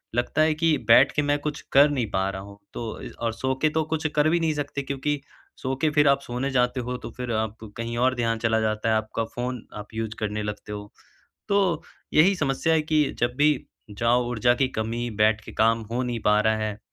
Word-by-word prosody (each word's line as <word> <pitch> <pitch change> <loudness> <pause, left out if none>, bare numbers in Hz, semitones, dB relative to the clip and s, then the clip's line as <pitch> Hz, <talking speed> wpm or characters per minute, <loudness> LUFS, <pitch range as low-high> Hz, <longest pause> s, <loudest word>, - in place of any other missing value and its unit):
लगता 120 +5 +1
है 155 0 +4
कि 160 -1 +2
बैठ 125 +4 +7
के 150 - +3
मैं 145 0 +1
कुछ 150 0 -4
कर 140 +2 +7
नहीं 130 -5 0
पा 95 0 0
रहा 95 0 -5
हूँ, 100 0 -12
तो 115 -2 -4
और - - -10
य 115 - -5
अ, - - -2
सो 130 +4 -1
के 155 - +4
तो 160 +1 0
कुछ 160 0 -1
कर 150 +1 +4
भी 170 +1 +2
नहीं 160 -2 +1
सकते, 145 -1 -3
क्योंकि 140 +1 -2 0.4
सो 130 0 -2
के 155 - +3
फिर 145 -1 +4
आप 140 0 +4
सोने 125 +3 -3
जाते 125 0 +1
हो, 125 +1 -3
तो - - -8
फिर 125 -1 -4
आप 110 0 -2 0.2
कहीं 115 0 -4
और 130 +1 +2
ध्यान 115 -1 0
चला 110 -1 +2
जाता 110 0 0
है। 110 - +3
आपका 110 +1 -1
फ़ोन 125 -1 -4
आप 105 0 -7
यूज़ 110 0 -3
करने 105 0 -2
लगते 105 0 -6
हो। 105 0 -7 0.6
तो 195 -5 +2 0.3
यही 185 +6 +5
समस्या 155 +1 +1
है 160 - +3
कि 155 0 +2 0.2
जब 120 0 +1
भी 150 +1 +5 0.4
जाओ, 120 +4 +2
ऊर्जा 120 +1 +3
की 130 +1 +2
कमी 115 +2 -2
बैठ 110 0 +4
के - - -8
काम 115 +1 +3
हो 125 +2 0
नहीं 120 -2 -2
पा 105 0 +5
रहा 110 0 +2
है। 110 -1 -3
125 Hz, 240 wpm, -25 LUFS, 110-145 Hz, 0.6 s, बैठ